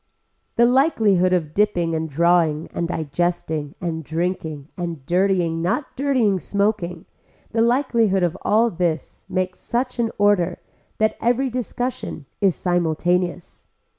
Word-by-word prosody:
The 235 - +5
likelihood 225 - +3
of 160 -4 0
dipping 175 -5 +1
and 160 0 -2
drawing 165 0 +2
and 170 - -1
digesting 160 -2 -2
and 165 -2 -3
drinking 160 -2 -3
and 170 -6 -5
dirtying 175 -1 +1
not 190 - -1
dirtying 250 -8 +2
smoking, 200 -4 -1 0.5
the 225 - +1
likelihood 235 -6 +2
of 175 0 +1
all 225 +2 +3
this 170 -3 -2
makes 185 -1 -2
such 250 +1 -2
an 230 -1 +2
order 200 -4 +3 0.4
that 220 0 +1
every 245 +3 +1
discussion 245 - -4 0.2
is 195 -4 +3
simultaneous. 175 0 -1
180 Hz, 125 wpm, -22 LUFS, 165-220 Hz, 0.5 s, The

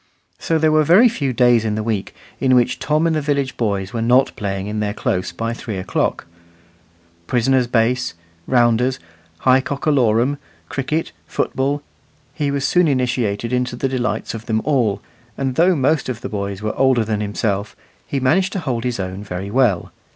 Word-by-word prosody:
So 165 - 0
there 155 0 +3
were 155 0 +4
very 185 - +6
few 145 - -1
days 120 -2 +4
in 110 -1 -1
the 110 - -2
week 105 -3 -3 0.2
in 130 -1 +3
which 120 -1 +2
Tom 155 +2 +1
and 165 -1 +2
the 155 - 0
village 140 -2 -1
boys 100 -4 -2
were 115 - -2
not 125 +4 +3
playing 95 -2 -3
in 105 +1 -3
their 105 0 -2
close 95 -9 -1
by 115 +7 -3
three 110 -3 -6
o'clock. 95 - -1 1.0
Prisoner's 125 +1 +2
base, 120 -2 +1 0.3
rounders, 120 0 +3 0.4
high 130 0 +5
cock 140 +1 -5
a 155 - +4
lorum, 125 +1 +2 0.3
cricket, 150 +4 -2 0.2
football 140 +2 -1 0.5
he 145 -2 -1
was 140 -1 0
soon 180 -1 +3
initiated 125 -4 0
into 125 -1 0
the 135 - -1
delights 130 -2 -2
of 115 0 -8
them 110 -1 0
all; 120 -9 +1 0.3
and 135 -1 -1
though 175 +6 +4
most 145 0 +1
of 120 -2 -4
the - - -5
boys 100 -1 -4
were 110 - -2
older 130 -4 +3
than 105 -1 -1
himself, 100 0 -2 0.3
he 140 - -1
managed 180 +9 +2
to 195 - -1
hold 125 -7 -2
his 125 -3 -2
own 95 +1 -4
very 95 0 -5
well. 120 -7 +2
125 Hz, 185 wpm, -20 LUFS, 110-140 Hz, 1.0 s, very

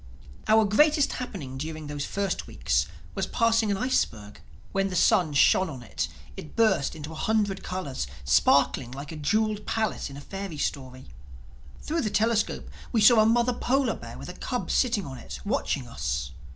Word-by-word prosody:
Our 220 0 +5
greatest 295 +7 +4
happening 160 - -6
during 155 +1 -5
those 145 -1 -4
first 195 -2 -2
weeks - - 0 0.3
was - - -2
passing 230 -2 +2
an 200 - +1
iceberg. 110 - -1 0.3
When 195 0 0
the 185 - -4
sun 175 -3 +3
shone 185 +6 +4
on 130 -5 -8
it - - -3 0.3
it 155 - -10
burst 220 -11 +2
into 155 0 -7
a - - -7
hundred 205 +3 0
colors, 140 - -4 0.2
sparkling 120 - +3
like 140 +3 -7
a - - -6
jeweled 210 +7 0
palace 220 -8 -1
in 140 - -9
a - - -8
fairy 195 -1 -6
story. 130 -3 -4 0.7
Through 325 +2 -1
the 215 - -1
telescope 220 +1 0 0.2
we 230 - +2
saw 220 +2 +7
a 215 - +6
mother 240 +2 +3
polar 265 +3 +1
bear - - -9
with - - -8
a - - -6
cub - - -3
sitting 225 -7 +2
on 130 -2 -7
it, - - -8
watching 200 - -1
us. 65 - -3
195 Hz, 180 wpm, -27 LUFS, 140-220 Hz, 0.7 s, saw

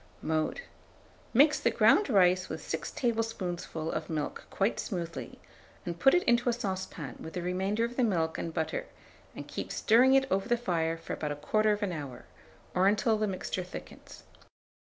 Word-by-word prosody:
Mode. 155 - -1 0.7
Mix 290 +5 +5
the - - +2
ground 415 - +4
rice 185 -4 +4
with - - -6
6 - - -3
tablespoonfuls 195 -9 -2
of 155 0 -3
the - - -5
milk 150 -2 -3
quite 200 +3 0
smoothly, 170 -5 -5 0.5
and 170 -1 -4
put 270 - +6
it 355 - +3
into 240 0 +3
a - - +2
saucepan 190 - -4
with 160 - -8
the 180 - -3
remainder 190 +5 0
of 240 +1 -7
the 255 - +3
milk 165 -7 0
and 165 - -3
butter, 160 0 -2 0.5
and - - -7
keep - - -5
stirring 250 +4 +5
it 270 0 +4
over 195 +4 0
the 240 - +3
fire 165 -7 -1
for 165 - -6
about 145 -1 -3
1/4 210 +3 +1
hour, 140 -6 -7 0.5
or 185 +1 +3
until 215 +2 +3
the 215 - +1
mixture 185 -1 -3
thickens. 180 - -11
190 Hz, 175 wpm, -30 LUFS, 165-230 Hz, 0.7 s, put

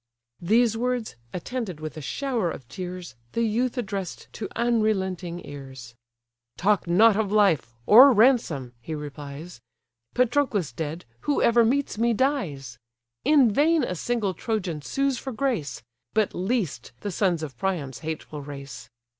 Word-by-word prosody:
These 225 +5 +3
words, 245 - -2 0.2
attended 185 -2 -4
with 155 +1 -6
a 155 - -6
shower 240 - -1
of 130 -6 -8
tears, 180 -3 -7 0.2
The 230 - +1
youth 235 +4 0
address'd 195 -6 -5
to 220 - -5
unrelenting 190 -7 0
ears: 135 -4 -9 0.6
"Talk 200 -1 +2
not 205 +5 +6
of 205 -2 0
life, 190 - +3
or 255 +6 +9
ransom 210 - +3
(he 155 +7 -5
replies): 145 0 -8 0.5
Patroclus 245 - +1
dead, 155 +6 -5 0.2
whoever 235 -4 +4
meets 260 -1 0
me, 235 0 +2
dies: 175 - -1 0.4
In 280 -7 +5
vain 310 +4 +3
a 185 - -1
single 210 +1 -1
Trojan 180 -6 -3
sues 275 - -1
for 265 - -5
grace; 220 - -2 0.3
But 215 -2 +2
least, 180 - -2
the 205 - -3
sons 175 -3 +1
of 140 -5 -6
Priam's 145 -4 -2
hateful 155 -1 -5
race. 140 -1 -9
195 Hz, 140 wpm, -25 LUFS, 155-235 Hz, 0.6 s, or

